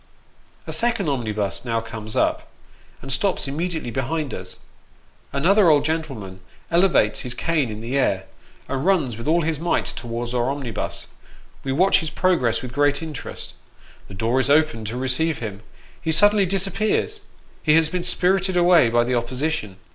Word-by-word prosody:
A - - -6
second 230 -8 0
omnibus 110 -7 -2
now 115 -2 0
comes 110 -1 -8
up, - - +1 0.6
and 135 - -5
stops 180 +3 0
immediately 160 -2 -3
behind 135 +4 -2
us. - - -7 0.7
Another 180 +7 +4
old 145 -2 +4
gentleman 135 -13 -3 0.3
elevates 170 - +3
his 125 -1 -4
cane 155 -3 0
in 105 0 -6
the 120 +4 -3
air, 95 -8 +1 0.4
and 135 0 -2
runs 160 - +2
with 115 +5 -7
all 165 +2 +3
his 155 -2 -1
might 170 +2 0
towards 120 0 -5
our 120 +1 +1
omnibus; 130 -7 -3 0.6
we 135 - -2
watch 185 +9 +4
his 160 -3 -3
progress 125 -13 +1
with 125 -2 -7
great 145 +2 +2
interest; 155 -4 -7 0.5
the 100 - -10
door 115 +6 +1
is 130 +1 +1
opened 150 -7 +2
to 115 +3 -4
receive 130 +4 0
him, 105 -3 -6 0.4
he 160 - -1
suddenly 205 +4 +5
disappears 200 - 0 0.4
he 155 -1 +4
has 160 -1 +5
been 180 +3 -2
spirited 190 +1 +1
away 175 -8 +5
by 120 +1 +3
the 125 +1 -1
opposition. 125 -3 -2
140 Hz, 160 wpm, -22 LUFS, 120-170 Hz, 0.7 s, suddenly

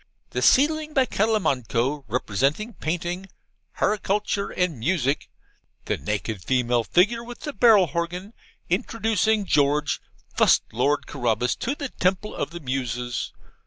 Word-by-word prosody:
The - - -2
ceiling, 305 +2 +3
by 265 -2 +4
Calimanco, 140 - 0
represents 125 - 0 0.2
Painting, 175 +3 -3 0.5
Harchitecture 205 -1 0
and 180 -8 -1
Music 140 +1 0 0.6
(the - - 0
naked 105 +5 -3
female 125 -2 +1
figure 215 - +2
with 240 0 -10
the 295 - -5
barrel 210 -3 +6
horgan) 170 +6 -4 0.3
introducing 220 +2 +1
George, 145 -2 +2 0.3
fust - - +5
Lord 140 +5 +1
Carabas, 125 -2 0
to 270 +4 -2
the 285 -3 -5
Temple 190 +2 -1
of - - -3
the 170 - -8
Muses. 125 -2 -3
170 Hz, 125 wpm, -24 LUFS, 125-210 Hz, 0.6 s, barrel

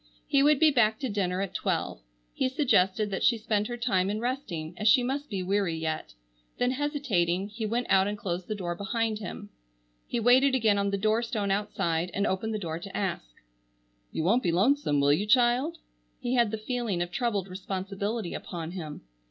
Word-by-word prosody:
He 280 -2 +3
would 295 0 +5
be 315 -1 +6
back 220 -5 +3
to 260 - -1
dinner 190 -3 -1
at 195 - -6
twelve. - - -2 0.3
He 260 - 0
suggested 215 - +2
that 190 - -2
she 235 - +4
spend 210 -1 0
her 240 0 -5
time 195 -6 +1
in 210 +1 -2
resting, 220 - -3
as 210 - -1
she 245 +4 +6
must 280 +4 -3
be 195 -4 -3
weary 190 -2 0
yet. 160 - -4 0.4
Then 245 0 +1
hesitating, 225 - 0
he 215 +1 -4
went 240 +3 -1
out 190 0 +4
and 205 0 -3
closed 180 -2 -4
the 215 - -2
door 175 -4 -3
behind 215 +3 -2
him. 205 -1 -7 0.6
He 240 - -1
waited 260 +4 +5
again 215 -5 +3
on 200 0 +1
the 200 - 0
door 215 +3 +2
stone 220 -4 -2
outside 190 -4 -1
and 200 - +1
opened 205 +3 -1
the - - 0
door 165 -5 -4
to 195 +2 -7
ask: 190 - -2 0.8
"You - - -2
won't 220 +9 +3
be 175 - +1
lonesome, 195 - +2
will 140 +1 +4
you, 200 +8 0
child?" 250 +7 +3 0.4
He 245 -1 -2
had 240 -3 +3
the 220 - -3
feeling 225 -4 -2
of 175 - -8
troubled 205 -2 -1
responsibility 195 +2 -4
upon 165 -2 -6
him. 160 -5 -7
205 Hz, 200 wpm, -28 LUFS, 185-240 Hz, 0.8 s, be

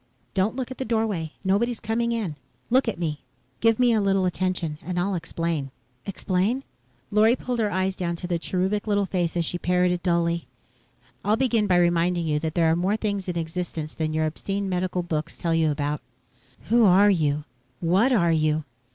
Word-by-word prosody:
"Don't 195 +4 +1
look 260 -1 -4
at 260 - -8
the - - 0
doorway. 220 -9 -1
Nobody's 220 +5 +1
coming 230 +2 -1
in. 215 -10 -2 0.4
Look 260 +1 +4
at 225 - -1
me. 155 -4 -3 0.4
Give 225 -1 +3
me 245 -2 +4
a 220 - +3
little 195 -1 +2
attention 180 -4 -1
and 180 -1 -3
I'll 195 +3 0
explain." 165 -4 -2 0.4
"Explain?" 195 +6 0 0.5
Lorry 215 +3 +5
pulled 250 -1 -3
her 215 -2 +2
eyes 190 -1 0
down 170 -2 -2
to 175 - -7
the 175 -1 -1
cherubic 190 +5 -1
little 205 -1 +2
face 175 -3 -1
as 170 - +1
she 175 - -2
parroted 180 0 +1
dully. 170 -1 0 0.8
"I'll 215 +2 +2
begin 230 -4 +2
by 180 -2 +4
reminding 175 0 +2
you 150 -1 +1
that 160 0 -3
there 165 -2 +4
are - - +3
more 190 +5 +1
things 200 -3 -2
in 175 - -2
existence 160 -1 -4
than 155 -1 -2
your 155 0 +1
obscene 195 +5 -3
medical 180 -1 -1
books 160 -1 -3
tell 165 -1 -1
you 160 -1 +3
about." 145 0 -2 0.7
"Who 235 +1 +5
are 200 +1 +6
you? 150 -5 +1 0.4
What 190 +10 +3
are 170 -9 +3
you?" 155 -1 +1
180 Hz, 190 wpm, -25 LUFS, 165-210 Hz, 0.8 s, are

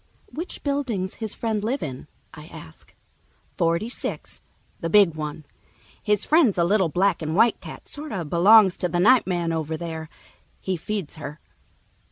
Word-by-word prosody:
"Which 340 +4 -6
building's 255 -10 -2
his 220 -2 -2
friend 220 -3 -2
live 255 +6 -1
in?" 135 -1 -6 0.3
I 150 0 -11
ask. 80 - -13 0.6
"Forty 170 +5 +1
six, 240 - -4 0.4
the 165 - -3
big 200 -3 +5
one. 150 0 -6 0.6
His 210 -1 +1
friend's 305 - +4
a 170 - +3
little 190 0 +2
black 185 +2 +1
and 155 0 -2
white 230 +4 +3
cat, - - -10
sort 300 +1 -6
of 175 -6 -4
belongs 190 +4 +6
to 180 - -1
the 175 +1 -1
night 235 +5 +5
man 175 -3 -1
over 160 0 -2
there. 160 -1 -6 0.5
He 190 - -2
feeds 185 -2 -5
her." 150 0 -8
185 Hz, 165 wpm, -24 LUFS, 160-215 Hz, 0.6 s, belongs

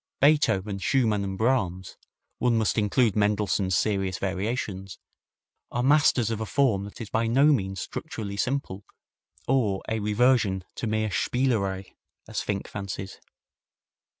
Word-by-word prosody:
Beethoven, 105 -10 +3
Schumann 110 -1 +1
and 95 -1 -4
Brahms 95 -7 0 0.4
one 120 -2 +2
must 110 -2 +1
include 105 +1 +2
Mendelssohn's 100 -3 +1
Serious 95 -1 0
Variations 95 0 -3 0.7
are 120 - -1
masters 135 -5 +4
of 110 -1 -3
a - - -1
form 115 -8 +1
that 100 - -11
is 110 -3 -7
by 115 0 +1
no 140 +6 +5
means 95 - -2
structurally 100 -2 -5
simple 105 -4 -2 0.6
or 115 -7 +1
a 110 - -1
reversion 105 -2 +2
to 115 - -4
mere 110 0 0
spielerei, 100 -6 0 0.3
as - - -3
Finck 100 -1 -3
fancies. 95 -1 -6
105 Hz, 130 wpm, -26 LUFS, 95-120 Hz, 0.7 s, no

